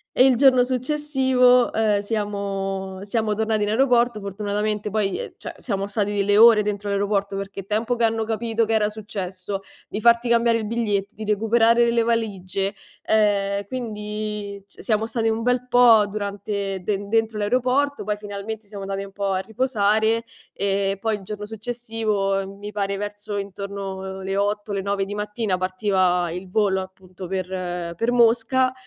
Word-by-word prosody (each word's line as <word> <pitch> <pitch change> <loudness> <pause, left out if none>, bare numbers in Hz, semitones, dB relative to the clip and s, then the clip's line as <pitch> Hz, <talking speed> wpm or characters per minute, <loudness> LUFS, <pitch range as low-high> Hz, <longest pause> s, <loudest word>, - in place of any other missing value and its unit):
e 255 - +6
il 260 -2 +5
giorno 255 -1 +5
successivo, 255 -2 +2
ehm, 215 -2 +2
siamo 195 -2 -3
siamo 215 0 -1
tornati 220 0 0
in 205 - 0
aeroporto. 240 -1 +3
Fortunatamente 210 +1 -2
poi 210 - 0
ehm, 485 - -6
cioè - - -7
siamo 200 -4 -2
stati 205 0 -1
delle 205 +1 +2
ore 225 -2 +8
dentro 205 0 -3
l'aeroporto 200 0 0
perché 195 0 -6
il 190 - -7
tempo 225 +3 0
che 235 - -1
hanno 225 0 +2
capito 225 +1 0
che 225 - -1
era 210 -1 +3
successo, 195 -2 -5 0.3
di 210 - -5
farti 235 +1 +4
cambiare 235 0 +3
il 220 - -3
biglietto, 210 -3 -1
di 215 - -8
recuperare 225 +3 +3
le 235 0 +2
valigie, 200 -4 -1 0.3
ehm, 200 -2 +2
quindi 210 -4 -5
c - - -13
siamo 220 -1 +1
stati 225 0 0
un 225 +1 -1
bel 250 0 +1
po' 235 -4 +6
durante 200 -1 -3
de 200 +1 -2
dentro 225 -1 +1
l'aeroporto, 255 +6 +1
poi 210 +1 -1
finalmente 210 +1 -6
siamo 200 -1 -8
andati 195 0 -3
un 200 - -10
po' 200 0 -2
a 185 - 0
riposare 220 0 +1 0.3
e 195 0 0
poi 220 -1 0
il 200 - -13
giorno 210 +1 -6
successivo, 215 -4 -2
mi 205 +1 -7
pare 200 -1 -2
verso 205 0 -5
intorno 195 -1 -5
le 195 +1 -2
8 205 +1 -1
le 195 - -1
9 200 0 -1
di 205 - -6
mattina 210 -2 -2
partiva 185 -2 +1
il 180 +2 -7
volo 195 -2 +1
appunto 185 -1 -10
per 180 -2 -3
per 230 +6 0
Mosca, 245 +2 +3
210 Hz, 165 wpm, -23 LUFS, 195-225 Hz, 0.3 s, ore